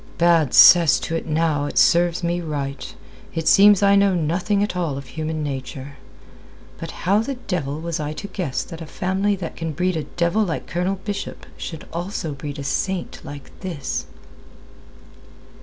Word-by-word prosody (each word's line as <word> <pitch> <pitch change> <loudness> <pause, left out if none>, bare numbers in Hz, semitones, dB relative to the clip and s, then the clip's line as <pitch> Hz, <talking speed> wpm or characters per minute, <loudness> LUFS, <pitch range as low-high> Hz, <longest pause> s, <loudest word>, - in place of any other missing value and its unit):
"Bad 165 -5 +3
cess 170 -5 +8
to 165 - -3
it 165 - -4
now, 155 -2 +1
it - - -6
serves 175 0 +4
me 175 +1 0
right. 140 -4 -5 0.4
It 165 -1 -2
seems 205 0 +6
I 200 0 +5
know 200 -1 +4
nothing 180 +5 0
at 205 - -3
all 165 -6 -1
of 140 - -7
human 155 +2 -3
nature. 135 0 -6 0.8
But - - -6 0.2
how 200 +4 +4
the 265 +5 -2
devil 160 - -3
was 170 0 -3
I 150 0 -3
to 200 - -7
guess 150 -10 -3
that 165 -2 -10
a 160 - -7
family 190 +5 0
that 180 -4 -6
can 165 -1 -4
breed 180 +4 0
a 155 - -3
devil 170 +5 0
like 175 -5 -3
Colonel 185 +2 -2
Bishop 205 -2 -5
should 160 -2 -7
also 175 -1 -3
breed 145 +1 -6
a 140 - -5
saint 180 +7 -2
like 145 -1 -9
this?" 170 -8 -4
170 Hz, 175 wpm, -22 LUFS, 150-185 Hz, 0.8 s, cess